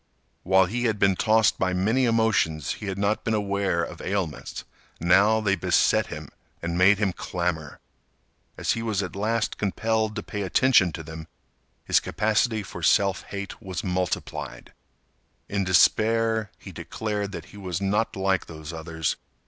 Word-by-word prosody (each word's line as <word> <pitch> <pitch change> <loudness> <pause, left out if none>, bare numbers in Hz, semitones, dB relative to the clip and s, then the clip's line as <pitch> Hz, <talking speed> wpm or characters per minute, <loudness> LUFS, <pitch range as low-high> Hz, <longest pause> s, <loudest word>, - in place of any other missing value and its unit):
While 95 +1 +4
he 120 +7 -2
had 110 -2 +1
been 100 -2 +3
tossed 110 +2 +3
by 95 0 +1
many 110 +8 +2
emotions, 90 - +1
he 105 - -6
had 95 0 -3
not 100 +2 0
been 115 - 0
aware 100 -4 0
of - - -7
ailments. 95 -6 -3 0.4
Now 95 +6 +4
they 100 -2 +2
beset 85 - +2
him - - -8 0.3
and 85 0 -3
made 95 +3 +5 0.2
clamor. 85 -4 -3 0.8
As - - 0
he 115 - -1
was 110 -4 -1
at 90 -2 -6
last 110 +3 -1
compelled 110 +1 0
to 105 - -4
pay 105 - -5
attention 100 -1 +4
to 80 - -6
them, 80 +1 -9 0.6
his - - +4
capacity 110 +4 0
for - - -9
self 100 -2 +3
hate 100 +2 -7
was 95 -4 -5
multiplied. 90 -1 -3 0.7
In 100 -1 -1
despair, 110 +4 +3
he - - -11
declared 105 -2 -4
that - - -6
he - - -11
was 90 -3 -4
not 100 +3 0
like 95 -1 0
those 80 0 -8
others. 80 -1 -3
100 Hz, 155 wpm, -25 LUFS, 90-110 Hz, 0.8 s, made